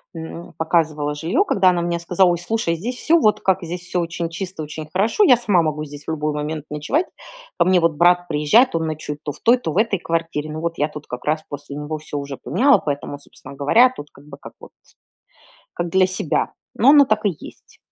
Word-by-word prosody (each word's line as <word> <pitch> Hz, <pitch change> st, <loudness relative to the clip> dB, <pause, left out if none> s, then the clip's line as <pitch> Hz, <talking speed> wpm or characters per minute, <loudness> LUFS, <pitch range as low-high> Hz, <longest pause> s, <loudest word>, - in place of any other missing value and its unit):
м, 165 Hz, +1 st, -8 dB
показывала 155 Hz, -3 st, 0 dB
жилье, 175 Hz, -, +1 dB
когда 190 Hz, -, +4 dB
она 175 Hz, -1 st, +1 dB
мне 170 Hz, 0 st, -1 dB
сказала: 180 Hz, +2 st, +2 dB
"Ой, 175 Hz, -, +1 dB
слушай, 175 Hz, -1 st, -1 dB
здесь 230 Hz, +10 st, -4 dB
всё 335 Hz, +5 st, +3 dB
вот 215 Hz, -8 st, +3 dB
как, 190 Hz, -1 st, +2 dB
здесь 175 Hz, +1 st, -5 dB
все 180 Hz, 0 st, -3 dB
очень 170 Hz, 0 st, -3 dB
чисто, 180 Hz, -1 st, -6 dB
очень 155 Hz, +1 st, -7 dB
хорошо, 215 Hz, -, +2 dB
я 255 Hz, -, +6 dB
сама 205 Hz, -7 st, +2 dB
могу 155 Hz, -1 st, -2 dB
здесь 145 Hz, 0 st, -11 dB
в -, -, -3 dB
любой 150 Hz, -1 st, -2 dB
момент 150 Hz, 0 st, -4 dB
ночевать, 150 Hz, -, -1 dB, 0.5 s
ко -, -, +3 dB
мне 185 Hz, -1 st, +4 dB
вот 165 Hz, -2 st, +2 dB
брат 175 Hz, +2 st, +3 dB
приезжает, 150 Hz, -, +3 dB
он 165 Hz, -1 st, 0 dB
ночует 150 Hz, -1 st, -5 dB
то 145 Hz, -, -3 dB
в -, -, -14 dB
той, 240 Hz, +2 st, +4 dB
то 165 Hz, -10 st, -4 dB
в 155 Hz, -, -4 dB
этой 215 Hz, -1 st, +2 dB
квартире, 165 Hz, -3 st, -3 dB
ну 155 Hz, -, -5 dB
вот 165 Hz, +1 st, -3 dB
я 150 Hz, +1 st, 0 dB
тут 150 Hz, -1 st, -10 dB
как 125 Hz, -, -7 dB
раз 155 Hz, +1 st, 0 dB
после 145 Hz, 0 st, -8 dB
него 150 Hz, +2 st, -4 dB
всё 150 Hz, -1 st, -7 dB
уже 140 Hz, -1 st, -6 dB
поняла, 275 Hz, +2 st, +3 dB
поэтому, 145 Hz, -1 st, -4 dB
собственно 140 Hz, -, -13 dB
говоря, 220 Hz, -, +4 dB
тут 150 Hz, -, -9 dB
как 140 Hz, -, -18 dB
бы 140 Hz, -1 st, -11 dB, 0.2 s
вот, -, -, -14 dB, 1.0 s
как 175 Hz, 0 st, -3 dB
для 185 Hz, +1 st, +4 dB
себя". 185 Hz, -4 st, -1 dB, 0.2 s
Но 250 Hz, +5 st, +5 dB
оно 290 Hz, -1 st, +7 dB
так 215 Hz, -4 st, 0 dB
и 180 Hz, -6 st, 0 dB
есть. -, -, -14 dB
165 Hz, 225 wpm, -20 LUFS, 150-190 Hz, 1.0 s, оно